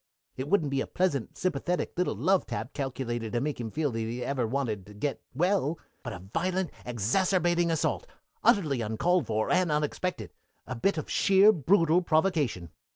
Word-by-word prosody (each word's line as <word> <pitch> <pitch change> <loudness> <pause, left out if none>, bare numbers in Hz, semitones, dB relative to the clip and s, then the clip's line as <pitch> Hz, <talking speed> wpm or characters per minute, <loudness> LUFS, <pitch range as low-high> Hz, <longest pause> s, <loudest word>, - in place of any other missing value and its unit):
It 130 - -4
wouldn't 160 -8 +2
be 135 -1 +1
a - - -3
pleasant, 175 -10 -1
sympathetic 180 0 -1
little 180 +1 0
love 190 0 +2
tap 130 - -5
calculated 120 -5 -3
to 120 - +1
make 145 +1 -2
him 115 - -4
feel 150 +4 -1
that 115 - -3
he 115 +2 -3
never 130 +1 -1
even 115 -1 -1
wanted 115 -8 -2
to 105 - -13
get 135 +7 -3
well, 170 -1 +1 0.2
but 120 - -6
a 90 - -6
violent, 175 - -2 0.2
exacerbating 175 - +1
assault; 160 -2 0 0.4
utterly 150 - +3
uncalled 160 +12 +1
for 110 0 0
and 180 -2 +3
unexpected; 150 +4 -2 0.3
a - - -5
bit 185 +10 +1
of 155 - -3
sheer, 195 +2 +5
brutal 170 - +3
provocation. 155 - 0
150 Hz, 175 wpm, -28 LUFS, 120-180 Hz, 0.4 s, sheer